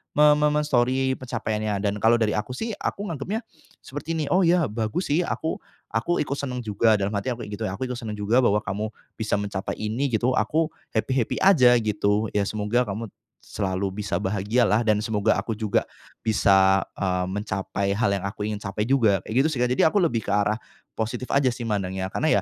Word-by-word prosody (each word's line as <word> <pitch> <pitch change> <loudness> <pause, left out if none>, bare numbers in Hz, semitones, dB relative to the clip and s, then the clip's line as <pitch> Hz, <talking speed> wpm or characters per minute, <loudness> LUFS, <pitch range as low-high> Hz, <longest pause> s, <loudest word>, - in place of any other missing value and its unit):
me 150 0 +7
me 150 0 +3
me-Story 130 -1 +1
pencapaiannya 110 -5 -2
dan 100 - +1
kalau 115 +3 +5
dari 105 -1 +2
aku 105 - -3
sih 225 - -3
aku - - -3
nganggepnya 175 - -3 0.4
seperti 145 +4 -5
ini, 155 - -1
oh 185 +1 +4
ya 170 -2 +3
bagus 110 - -2
sih 160 +5 +3
aku 160 - -2 0.3
aku 145 +10 0
ikut 140 -1 -2
seneng 130 -3 -3
juga, 110 +1 +3
dalam 100 - 0
hati 100 +6 -1
aku 120 - -9
kayak - - -10
gitu - - -6
ya, 95 - -4
aku 130 +5 -3
itu 125 - -3
seneng 110 -3 -5
juga 110 +5 +3
bahwa 105 -2 +3
kamu 105 +3 -3 0.3
bisa 110 -2 0
mencapai 100 -1 -3
ini 110 +6 -1
gitu, 125 +3 +1
aku 160 +1 +1 0.3
happy-happy 120 +1 0
aja 150 -11 +6
gitu. 105 0 +1
Ya 105 - +3
semoga 110 +4 0
kamu 105 +3 -4 0.4
selalu 95 -1 -2
bisa 100 - -1
bahagialah 105 +3 +1
dan 110 -2 +3
semoga 105 -3 +1
aku 115 - -3
juga 105 -2 0 0.4
bisa, 95 -3 +4 0.2
eee, 90 -1 0
mencapai 100 -1 -2
hal 105 -1 +1
yang 100 -1 -4
aku 105 +1 -7
ingin 105 -1 -2
capai 100 +1 -2
juga 110 -8 +4
kayak 110 - -6
gitu - - +5
sih 130 - -3
Kak. 125 - +1
Jadi 125 - +3
aku 205 - +2
lebih 120 -10 0
ke - - -2
arah 105 +1 +2 0.4
positif 120 +3 -3
aja 140 -1 +3
sih, 120 - -9
mandangnya 95 -3 -2
karena 155 +9 +2
110 Hz, 200 wpm, -24 LUFS, 100-130 Hz, 0.4 s, me